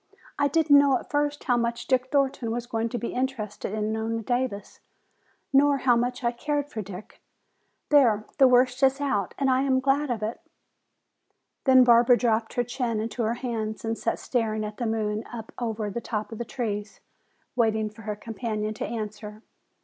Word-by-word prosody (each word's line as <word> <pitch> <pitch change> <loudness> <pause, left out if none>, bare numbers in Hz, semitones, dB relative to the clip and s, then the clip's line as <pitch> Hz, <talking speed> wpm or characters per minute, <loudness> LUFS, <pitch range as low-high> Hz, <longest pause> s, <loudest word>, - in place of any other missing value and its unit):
I 285 - +4
didn't 290 -1 +5
know 280 -2 +4
at - - -12
first 290 0 0
how 245 -3 +2
much 235 0 -1
Dick 255 -1 0
Thornton 270 -4 +1
was 235 +1 -3
going 230 -1 -2
to 240 - -3
be 235 - -4
interested 250 -7 -3
in 215 0 -1
Nona 225 +1 -2
Davis, 245 -3 -2 0.7
nor 285 +1 +5
how 250 -2 +3
much 245 +2 -1
I 235 - +2
cared 290 +4 -2
for 220 - -4
Dick. 195 0 -10 0.7
There, 235 -8 +4
the 265 - +8
worst 250 +1 +3
is 270 0 +4
out 205 -10 -1
and 275 - +1
I 260 0 +3
am 265 -1 +2
glad 275 +2 +1
of 225 -3 -2
it!" 220 +2 -4 1.2
Then 260 -2 +7
Barbara 240 0 +6
dropped 225 -2 0
her 245 - +2
chin 240 -2 -2
into 225 +2 -3
her 225 +1 0
hands 225 -3 -4
and 225 0 -1
sat 230 - -2
staring 220 -3 -1
at 210 0 -7
the 240 - -2
moon 215 -1 -1
up 225 -2 -8
over 220 -3 -2
the 235 - -4
top 215 -2 -4
of 225 - -7
the 235 - -3
trees, 210 -4 -4 0.6
waiting 220 -3 +2
for 215 - -14
her 210 -1 -4
companion 215 -1 -4
to - - -4
answer. 215 -1 -6
235 Hz, 190 wpm, -26 LUFS, 220-260 Hz, 1.2 s, the